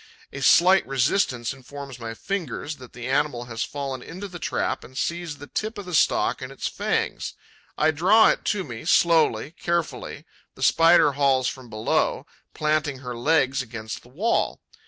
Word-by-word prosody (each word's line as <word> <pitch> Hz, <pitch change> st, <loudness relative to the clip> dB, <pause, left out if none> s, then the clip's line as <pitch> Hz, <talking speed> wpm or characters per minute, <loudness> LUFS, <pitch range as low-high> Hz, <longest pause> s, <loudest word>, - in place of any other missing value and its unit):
A 135 Hz, -, -6 dB
slight 185 Hz, +7 st, +6 dB
resistance 130 Hz, -, +1 dB
informs 135 Hz, -1 st, -10 dB
my 115 Hz, -1 st, -6 dB
fingers 160 Hz, -, -4 dB
that 125 Hz, -2 st, -13 dB
the 120 Hz, 0 st, -7 dB
animal 135 Hz, -3 st, 0 dB
has 115 Hz, -1 st, -3 dB
fallen 135 Hz, -3 st, -5 dB
into 185 Hz, +8 st, -7 dB
the 175 Hz, -2 st, -9 dB
trap -, -, -2 dB
and 130 Hz, -, -12 dB
seized 170 Hz, -2 st, -3 dB
the 145 Hz, -, -10 dB
tip 215 Hz, +9 st, -4 dB
of 205 Hz, -, -6 dB
the 180 Hz, -, -7 dB
stalk 155 Hz, -, +2 dB
in -, -, -5 dB
its -, -, -4 dB
fangs. -, -, -2 dB, 0.4 s
I 155 Hz, +1 st, +3 dB
draw 190 Hz, +9 st, +5 dB
it -, -, 0 dB
to 205 Hz, -3 st, 0 dB
me, 120 Hz, -8 st, -8 dB
slowly, 155 Hz, -6 st, +3 dB
carefully; 170 Hz, -1 st, -3 dB, 0.3 s
the -, -, -6 dB
Spider 165 Hz, -2 st, +5 dB
hauls 135 Hz, -2 st, +2 dB
from 130 Hz, -3 st, -6 dB
below, 110 Hz, 0 st, 0 dB, 0.3 s
planting 150 Hz, -2 st, 0 dB
her 125 Hz, -2 st, -6 dB
legs 135 Hz, +1 st, +2 dB
against 110 Hz, -3 st, -7 dB
the 120 Hz, -, -19 dB
wall. 195 Hz, -, 0 dB
145 Hz, 170 wpm, -24 LUFS, 125-170 Hz, 0.4 s, slight